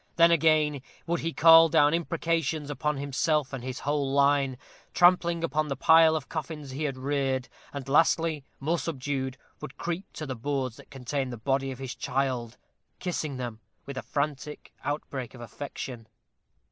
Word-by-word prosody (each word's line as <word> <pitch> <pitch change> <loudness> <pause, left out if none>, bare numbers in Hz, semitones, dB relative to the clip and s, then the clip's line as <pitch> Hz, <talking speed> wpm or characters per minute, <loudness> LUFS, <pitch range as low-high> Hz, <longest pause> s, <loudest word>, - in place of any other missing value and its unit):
Then, 170 0 +6
again, 155 -3 +3 0.2
would 170 0 -1
he 165 - -2
call 165 0 +8
down 150 -1 +4
imprecations 165 -3 -1
upon 150 0 -1
himself 140 +1 0
and 130 -2 -5
his 130 0 -5
whole 145 -1 0
line, 140 -2 +3 0.4
trampling 170 -1 +4
upon 155 -2 0
the 140 - -2
pile 160 +2 +6
of 150 -4 -3
coffins 150 -2 -5
he 145 +4 -3
had 135 -3 -3
reared; 135 -1 -1 0.2
and 140 -2 -6
lastly, 160 +1 +2 0.2
more 165 +5 0
subdued, 135 -4 -3 0.2
would 130 - -8
creep 175 +3 -4
to 155 - -6
the 135 - -4
boards 130 0 -3
that - - -15
contained 135 0 -3
the 120 - -6
body 135 +3 0
of 130 - -6
his 130 -1 -5
child, 125 -3 -2 0.4
kissing 155 -6 -3
them 120 -3 -5 0.3
with 140 - -7
a 130 - -3
frantic 145 0 -4
outbreak 135 -4 -4
of 120 - -11
affection. 120 -2 -7
145 Hz, 165 wpm, -28 LUFS, 130-160 Hz, 0.4 s, call